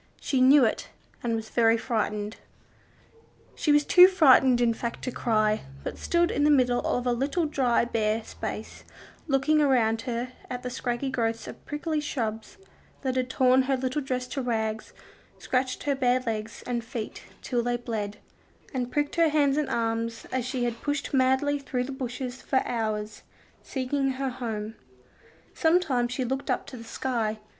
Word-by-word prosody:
She 265 -2 0
knew 265 +1 +7
it, 220 - -2 0.3
and 235 -1 -1
was 220 -1 -5
very 230 -1 +4
frightened. 215 -2 -2 1.2
She 300 - 0
was 295 0 +4
too 360 0 +9
frightened 265 -8 +5
in 235 -1 +3
fact 235 +1 -5
to 255 - -2
cry, 215 -3 +1 0.2
but - - -5
stood 345 0 +2
in 290 - 0
the 300 - +5
middle 250 -4 +4
of 245 - -1
a 245 - +2
little 280 +7 0
dry, 255 -6 +2
bare 220 -1 0
space, 215 0 -7 0.4
looking 300 +2 +3
around 230 -6 +3
her 240 +1 -2 0.2
at 250 -1 -5
the 250 - -4
scraggy 245 +2 -2
growths 230 -2 -1
of - - -10
prickly 305 +1 -2
shrubs 225 - -4 0.5
that 260 -1 -1
had 255 -1 0
torn 260 0 +4
her 270 - +3
little 260 +3 -1
dress 255 -2 -2
to 275 - -3
rags, 220 -3 -2 0.5
scratched 255 0 -1
her 285 - +1
bare 255 -2 +2
legs 225 -2 -4
and 240 -2 -2
feet 230 -2 -6 0.2
till 245 -2 0
they 240 0 0
bled, 215 -4 -4 0.6
and 250 -2 -2
pricked 290 +1 -1
her 335 -1 +5
hands 290 -2 +3
and 300 -1 0
arms 230 0 -2
as 255 -2 -1
she 255 -1 -2
had 235 -1 -2
pushed 290 0 -2
madly 265 +2 +2
through 260 -2 -2
the 265 - -5
bushes, 255 -1 -5
for 265 - +1
hours, 215 -2 -3 0.4
seeking 270 +1 -1
her 270 +1 -2
home. 225 -4 -4 0.8
Sometimes 315 -8 +2
she 255 0 -2
looked 265 +3 -3
up - - 0
to 260 - -9
the 230 - -9
sky. 230 -2 -2
250 Hz, 170 wpm, -27 LUFS, 230-275 Hz, 1.2 s, too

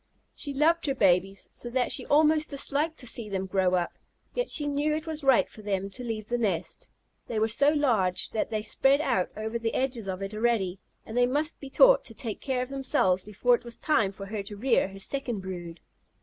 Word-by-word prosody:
She 285 - -5
loved 310 +4 +2
her 275 - 0
babies 195 -2 +2
so 240 - -2
that 250 0 0
she - - +4
almost 310 +1 +4
disliked 290 +3 -1
to - - -5
see 230 -2 -3
them 190 -1 -2
grow 185 -1 +1
up, 175 -1 -2 0.3
yet - - -2
she 295 - +1
knew 290 +1 0
it 310 +1 -4
was 315 -2 -4
right 265 -3 +4
for 215 - -13
them 195 -1 -2
to 250 - -7
leave 220 -3 -4
the 240 +1 -1
nest. 185 -6 -2 0.4
They 230 - -3
were 220 +1 +2
so 280 +6 +3
large 230 -12 +1
that 220 - -1
they 215 -1 -2
spread 270 +6 +2
out 245 -11 0
over 220 +2 -3
the 225 -1 -2
edges 250 -5 -1
of 190 0 -4
it 195 +2 -5
already, 215 -5 0 0.3
and 220 - -8
they 245 0 +4
must 300 +5 0
be 275 - -9
taught - - +6
to 225 - -5
take 225 -3 -4
care 260 -2 -1
of 255 - -8
themselves 190 -9 +1
before 210 +4 +1
it 240 - +1
was 235 -1 -4
time 225 -11 +2
for 195 0 -9
her 205 +1 -4
to 205 +1 -9
rear 240 0 +2
her 195 0 -11
second 240 -1 -2
brood. 175 -3 -7
235 Hz, 225 wpm, -27 LUFS, 195-275 Hz, 0.4 s, taught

